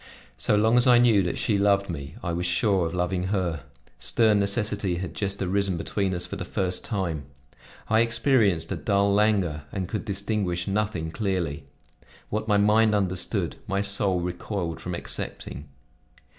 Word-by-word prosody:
So - - +2
long 110 +3 +4
as 125 - +4
I 125 -1 +7
knew 120 -4 +5
that 90 -2 -2
she 105 -3 +1
loved 100 -1 +3
me, 70 -2 -6
I 85 -2 -2
was 90 +1 -1
sure 90 0 +2
of 80 - -6
loving 90 +1 -1
her; 90 -6 -1 0.4
stern 110 - +3
necessity 100 -2 0
had 85 -2 -5
just 100 0 -3
arisen 95 0 0
between 95 +2 -1
us 90 - -3
for 100 - -6
the 95 - -4
first 90 0 -2
time. 85 - -2 0.6
I 110 +1 +3
experienced 115 - +2
a - - 0
dull 100 -1 +1
languor 100 -8 +1
and 95 -2 -3
could 105 - -3
distinguish 100 -3 -1
nothing 100 -5 -1
clearly. 85 -8 -2 0.7
What 110 +1 -2
my 105 -2 +3
mind 105 +1 +4
understood, 95 -3 -1
my 100 0 0
soul 100 -2 +1
recoiled 90 -1 -4
from 90 -1 -4
accepting. 70 -4 -5
100 Hz, 165 wpm, -26 LUFS, 90-105 Hz, 0.7 s, I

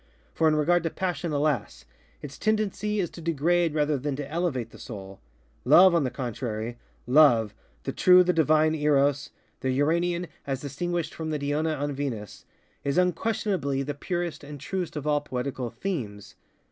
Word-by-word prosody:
For 160 - +2
in 155 - +3
regard 175 +4 +3
to 165 - -1
passion, 175 -2 -3
alas! 140 - -1 0.4
its 145 -1 -8
tendency 210 0 0
is 175 -4 -1
to 170 - -10
degrade 165 +1 +1
rather 150 -2 +1
than 140 +1 -2
to 140 0 -5
elevate 150 -9 -2
the - - -14
Soul. 95 -5 -9 0.4
Love, 175 +7 +7
on 170 -3 +3
the 130 - 0 1.0
contraryŌĆöLoveŌĆöthe 125 -6 +5 0.4
true, 180 0 +7
the 180 0 +1
divine 155 -1 +3
ErosŌĆöthe 145 -3 +2 0.5
Uranian 170 +5 +1 0.2
as 135 -1 -2
distinguished 165 +3 -3
from 160 -1 -5
the 155 - -1
Diona 150 +1 -1
an 145 0 -2
VenusŌĆöis 135 +2 -6
unquestionably 180 -6 0
the 145 +2 -3
purest 170 +1 -4
and 145 0 -9
truest 180 +4 -4
of 150 -1 -4
all 150 -1 +2
poetical 130 -2 -4
themes. 115 - -5
150 Hz, 150 wpm, -26 LUFS, 140-175 Hz, 1.0 s, Love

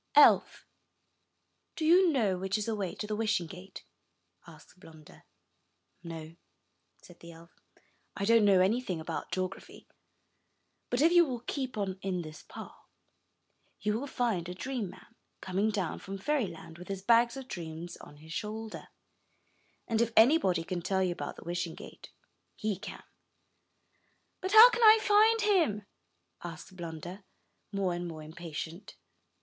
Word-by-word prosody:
''Elf, - - +5 1.1
do 315 - -2
you 350 +2 +6
know 220 -10 +1
which 190 +2 -1
is 210 - -3
the 225 - -1
way 200 -4 -3
to - - -5
the 210 0 -3
Wishing 210 -5 0
Gate?'' 185 +2 -11 0.6
asked - - -16
Blunder. 160 -3 -16 0.8
''No,*' 165 -1 -8 0.7
said 175 - -16
the 170 - -11
elf, 165 +1 -15 0.7
"I 200 - -1
don't 230 0 +5
know 195 -2 +5
anything 195 -2 0
about 160 - -5
geography. 185 0 -5 1.0
But 245 +4 +1
if 330 - +5
you 345 0 +7
will 255 -7 -4
keep 260 -1 -4
on 190 -2 -3
in 185 -2 -2
this 155 0 -10
path, - - -10 1.1
you 210 - 0
will 280 - -5
find 220 -10 -1
a 180 - -6
Dream 245 -1 -4
man, 190 +1 -14 0.3
coming 195 +3 0
down 190 -6 -2
from 195 0 -7
fairyland, 190 - -3
with 180 - -10
his 195 -1 -5
bags 235 +3 +4
of 265 -1 -8
dreams 170 -3 -7
on 145 - -14
his 160 +2 -11
shoulder; 215 +4 -5 1.0
and 225 -1 +1
if 235 0 +1
any 270 +9 +7
body 180 - 0
can 175 +1 -4
tell 190 +2 0
you 180 - 0
about 145 -4 -5
the - - -12
Wishing 175 -1 -3
Gate, - - -12 0.5
he 215 -1 -2
can.*' 190 - -9 1.4
"But 375 +2 -3
how 440 +2 +12
can 480 - -2
I 440 -1 +9
find 435 +2 +4
him?" 330 - +2 0.6
asked 175 +2 -9
Blunder 175 +2 -7 0.5
more 195 -3 0
and 175 0 -4
more 160 -2 -8
impatient. 165 +3 -8
195 Hz, 155 wpm, -30 LUFS, 175-235 Hz, 1.4 s, how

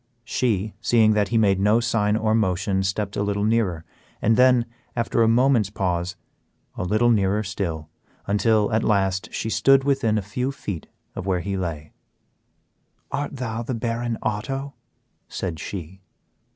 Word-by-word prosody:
She, 110 -4 0
seeing 110 -2 +4
that 105 -1 +2
he 115 - 0
made 100 -3 +3
no 105 +4 +4
sign 110 -2 +1
or 110 -1 +1
motion, 95 -2 +1
stepped 100 +1 -2
a - - -1
little 100 0 -1
nearer, 105 -7 0 0.3
and 115 +2 +3
then, 125 -1 +5 0.3
after 115 0 0
a 115 - +5
moment's 120 -2 +3
pause, 90 -2 -2 0.6
a - - -5
little 110 +6 +3
nearer 105 -1 +2
still, 85 -6 -4 0.4
until, 105 +1 +2
at 110 +1 +2
last, 95 0 +1
she - - -3
stood 135 +6 +4
within 135 -6 +1
a 105 - -1
few 125 +7 -2
feet 100 - -6 0.3
of 95 - -5
where 90 -2 +1
he 100 +2 -3
lay. 80 -5 -4 1.2
"Art 145 0 -3
thou 115 -3 -3
the 120 +2 -3
Baron 115 0 -2
Otto?" 135 +6 -3 0.6
said 85 -4 -4
she. 95 +1 -7
105 Hz, 155 wpm, -23 LUFS, 95-115 Hz, 1.2 s, then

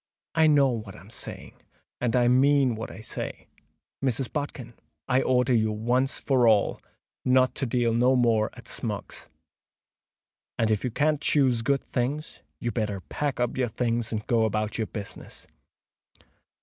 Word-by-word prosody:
"I 160 -1 +4
know 145 -3 +5
what 110 -5 -5
I - - -12
am 95 +6 -16
saying, - - -6 0.5
and 120 0 0
I 120 -1 +4
mean 135 0 +4
what 110 0 -5
I - - -10
say. 110 - -6 0.6
Mrs. 130 -1 -1
Bodkin, 140 -5 -4 0.3
I 130 0 +3
order 125 0 +2
you 110 -2 +2
once 120 +5 0
for 130 -4 +2
all 105 -3 +3 0.4
not 130 0 +3
to 135 - -2
deal 120 -1 +1
no 125 +3 +4
more 115 -3 +3
at - - -12
Smuggs's; - - -4 1.3
and 110 -1 +1
if 105 - 0
you 125 - 0
can't 150 +4 +1
choose 130 -5 +3
good 135 +3 +1
things, 140 +5 -3 0.2
you'd 120 - -3
better 105 -4 -2
pack 145 -3 -2
up 120 -1 0
your 130 -1 +1
things 115 0 -1
and 110 -1 -3
go 115 -3 +2
about 110 +1 -2
your 110 - -1
business." 105 -3 -8
120 Hz, 160 wpm, -26 LUFS, 110-130 Hz, 1.3 s, know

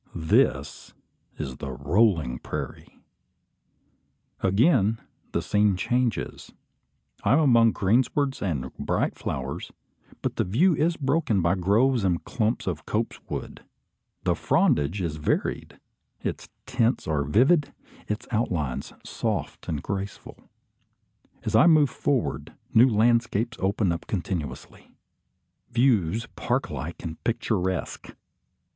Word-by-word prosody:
This 80 - +1 0.4
is 65 -1 -5
the 70 - -6
"rolling 75 - +1
prairie." - - -7 1.4
Again 110 - +3 0.3
the - - -1
scene 105 -2 +2
changes. 120 +4 -1 0.7
I 105 - +3
am 145 - +5
among 115 -7 +5
greenswards 130 +7 +1
and 70 -9 -2
bright - - 0
flowers; - - -4 0.5
but - - -2
the - - +2
view 155 - +3
is 165 +3 +1
broken 135 -6 +1
by 85 +2 +3
groves 105 +6 +2
and 90 -3 +1
clumps 110 0 -1
of 80 -5 -4
copse 115 +2 -2
wood. - - -6 0.6
The - - +2
frondage 75 +7 +1
is 80 -4 -2
varied, 75 - -2 0.4
its - - -4 0.2
tints 125 -2 0
are 75 -2 +1
vivid, 135 - +3 0.4
its 105 0 -4
outlines 85 - -1
soft - - -3
and 75 -2 -2
graceful. 100 +1 -6 0.9
As 110 - -1
I 115 - +7
move 150 -5 +5
forward, 135 -5 -1 0.2
new 120 +4 +7
landscapes 115 0 +2
open 95 0 +1
up 85 - -4
continuously: 85 - -5 0.8
views 115 -5 +2
park - - -1
like 75 +7 -6
and 80 -1 -7
picturesque. 95 -5 -2
105 Hz, 115 wpm, -26 LUFS, 85-120 Hz, 1.4 s, I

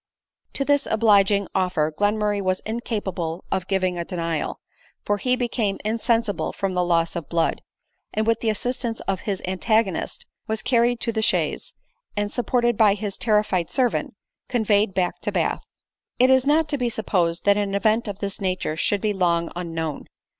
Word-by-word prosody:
To 275 - -1
this 285 0 +2
obliging 205 -3 +4
offer 180 -5 +1
Glenmurray 205 +1 +1
was 185 -1 0
incapable 195 -7 -3
of 190 -1 -1
giving 185 -2 0
a - - -1
denial; 165 -3 -3 0.5
for 205 - +1
he 250 +3 +2
became 235 -5 -1
insensible 225 -1 0
from 195 -1 -2
loss 175 -2 +1
of 170 -4 -5
blood, 165 -1 0 0.5
and 215 - 0
with 230 0 +2
the 225 - 0
assistance 235 +1 -2
of 195 -1 -2
his 195 -2 -2
antagonist 190 +1 0 0.2
was 220 0 -2
car 240 -2 +3
ried 240 0 +2
to 235 - 0
the 220 -1 -1
chaise, 220 - 0 0.4
and, 205 0 0
supported 240 -2 +1
by 210 -3 +5
his 205 -1 -4
terrified 210 -6 +1
servant, 250 -3 0 0.3
conveyed 210 -4 +2
back 180 -1 0
to - - -2
Bath. - - 0 0.6
It 255 +1 +5
is 260 +1 +4
not 310 +2 +3
to 285 - -1
be 245 -1 +1
supposed 180 -6 0
that 200 0 +5
an 200 -1 -1
event 215 +3 +2
of 200 -2 -4
this 200 -1 -4
nature 185 -4 -1
should 200 +5 +1
be 215 -1 +1
long 170 -3 +1
unknown. 165 -3 -4
205 Hz, 170 wpm, -23 LUFS, 185-230 Hz, 0.6 s, by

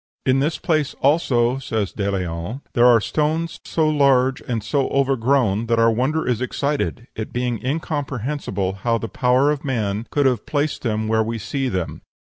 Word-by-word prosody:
"In 130 0 +3
this 150 +4 0
place, 155 -4 0
also," 130 -4 +2
says 110 -6 -2
De 100 -1 -2
Leon, 90 +5 -3
"there 120 0 +5
are 120 -2 +6
stones 155 +7 -1
so 160 -1 +1
large 135 -3 +3
and 115 -4 -3
so 135 +5 0
overgrown 130 -5 +1
that 115 0 +2
our 115 0 +4
wonder 135 +8 0
is 125 -2 0
excited, 140 -1 -2
it 110 - -5
being 125 -1 -2
incomprehensible 135 - -2
how 115 +1 +1
the 115 - -4
power 130 +5 +2
of 145 -2 -3
man 110 -5 -2
could 145 -1 +1
have 125 -5 +1
placed 145 0 -1
them 110 -2 -1
where 110 0 +2
we 115 +1 -2
see 135 +4 -2
them. 90 -5 -3
125 Hz, 175 wpm, -21 LUFS, 110-140 Hz, -, are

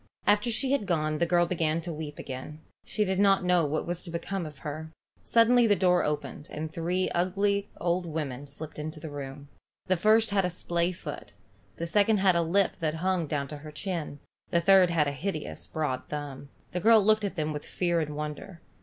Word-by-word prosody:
After 205 +3 +3
she 260 +4 +1
had 275 -8 +1
gone 155 -3 0
the 170 - +2
girl 175 -1 +4
began 165 -2 0
to 170 0 -5
weep 150 -1 -6
again. 135 +4 -7 0.2
She 210 - -1
did 190 0 0
not 195 -1 +4
know 180 -3 +3
what 155 +2 -1
was 175 0 -2
to 175 - -8
become 170 +1 -3
of 150 -2 -11
her. 155 +2 -5 0.3
Suddenly 235 +1 +5
the 205 - +5
door 180 -2 +3
opened, 150 0 -3
and 155 +1 -5
three 180 +3 0
ugly 200 +3 +1
old 175 0 0
women 145 -4 -4
slipped 150 +2 -7
into 155 +1 -5
the 155 0 -7
room. 140 0 -7 0.4
The 185 - +2
first 215 +4 +4
had 200 -1 +2
a 180 - +1
splayfoot. 170 - -3 0.4
The 170 - -4
second 205 +5 +3
had 190 -2 +4
a 170 - +3
lip 185 +4 +1
that 160 -1 -1
hung 180 -1 0
down 140 -2 -2
on 150 - -6
her 155 +1 -9
chin. 160 -2 -4 0.3
The 170 - +3
third 185 +1 +6
had 160 -3 +2
a - - 0
hideous 155 +3 -4
broad 150 -5 -2
thumb. 145 -2 -6 0.2
The 180 - -2
girl 220 +1 +6
looked 215 0 +4
at 200 -1 -2
them 155 -2 -1
with 150 - -5
fear 175 -2 0
and 150 -2 -3
wonder. 150 +4 -6
170 Hz, 205 wpm, -28 LUFS, 150-190 Hz, 0.4 s, third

